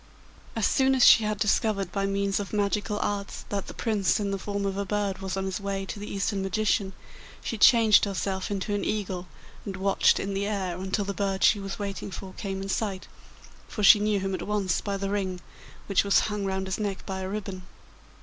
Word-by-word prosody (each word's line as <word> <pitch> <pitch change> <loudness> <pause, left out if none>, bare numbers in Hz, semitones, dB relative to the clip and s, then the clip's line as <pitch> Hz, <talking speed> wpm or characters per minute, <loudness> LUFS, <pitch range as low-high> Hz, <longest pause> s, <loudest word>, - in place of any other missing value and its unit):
As 225 - +1
soon 265 0 +3
as 255 - +5
she 220 - +8
had 210 0 -1
discovered 200 -2 +1
by 195 0 -1
means 195 0 0
of 200 0 -6
magical 205 0 0
arts 200 -1 -3
that 200 -2 -3
the - - -7
Prince 215 -4 +1
in 200 -1 -1
the 195 - -2
form 200 0 -3
of 195 -1 -1
a 200 - -1
bird 200 -1 -2
was 190 0 -4
on 190 - -1
his 190 0 -3
way 195 -1 -3
to 205 - -6
the 205 - -7
Eastern 200 0 -1
magician, 195 0 0 0.5
she - - -3
changed 220 -1 +6
herself 190 -1 -2
into 205 0 -2
an 205 - -1
eagle 190 -4 -2 0.4
and 195 -1 -5
watched 195 +1 +3
in 195 0 -3
the 200 +1 -1
air 190 -4 -2
until 190 +3 -2
the 200 - -3
bird 195 -1 -1
she 205 - +5
was 195 0 -5
waiting 200 -1 -4
for 190 0 -8
came 195 -2 -4
in 195 - -6
sight, 195 -2 -2 0.6
for 210 - -4
she 205 +1 +9
knew 210 -1 +1
him 195 0 -2
at 185 - -3
once 200 -4 0
by 200 -1 -2
the 195 0 -3
ring 190 -3 -2 0.5
which 200 - +2
was 200 -1 +4
hung 210 -2 -2
round 190 0 -2
his 190 +2 -3
neck 200 -3 -3
by 190 -1 -4
a 190 0 -4
ribbon. 195 -2 -5
200 Hz, 220 wpm, -27 LUFS, 195-205 Hz, 0.6 s, she